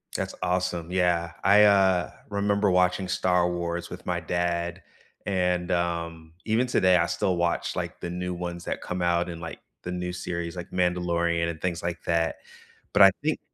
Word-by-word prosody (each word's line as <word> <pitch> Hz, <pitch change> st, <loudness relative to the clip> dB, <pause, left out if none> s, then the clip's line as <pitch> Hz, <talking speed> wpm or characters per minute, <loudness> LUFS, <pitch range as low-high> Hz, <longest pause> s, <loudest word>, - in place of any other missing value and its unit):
That's -, -, -3 dB
awesome, 90 Hz, -2 st, -1 dB
yeah, 85 Hz, -2 st, +1 dB
I, 105 Hz, +2 st, +7 dB
uh, 95 Hz, -5 st, +4 dB, 0.2 s
remember 100 Hz, 0 st, +1 dB
watching 90 Hz, +1 st, +2 dB
Star 90 Hz, -1 st, +2 dB
Wars 85 Hz, 0 st, -3 dB
with -, -, -9 dB
my -, -, -1 dB
dad, 85 Hz, 0 st, -2 dB, 0.4 s
and, 90 Hz, -2 st, 0 dB
um, 85 Hz, -2 st, -2 dB
even 115 Hz, +3 st, +2 dB
today 95 Hz, -6 st, +4 dB
I 85 Hz, -, +3 dB
still 90 Hz, +1 st, 0 dB
watch, 85 Hz, 0 st, -1 dB
like, -, -, -4 dB
the 85 Hz, -, -4 dB
new 90 Hz, +1 st, -3 dB
ones 85 Hz, -1 st, -5 dB
that -, -, -3 dB
come 90 Hz, 0 st, -4 dB
out 85 Hz, 0 st, +1 dB
in, 85 Hz, -, -6 dB
like, 85 Hz, 0 st, -7 dB, 0.2 s
the 90 Hz, -, -4 dB
new 90 Hz, 0 st, -3 dB
series, 85 Hz, -1 st, -4 dB
like, 85 Hz, -, -7 dB
Mandalorian 85 Hz, -2 st, +1 dB
and 80 Hz, -2 st, -6 dB
things 90 Hz, -2 st, -2 dB
like 85 Hz, 0 st, -4 dB
that. 85 Hz, -1 st, +1 dB, 0.6 s
But 100 Hz, -, +7 dB
I 95 Hz, -, +9 dB
think 155 Hz, 0 st, 0 dB
90 Hz, 175 wpm, -26 LUFS, 85-90 Hz, 0.6 s, I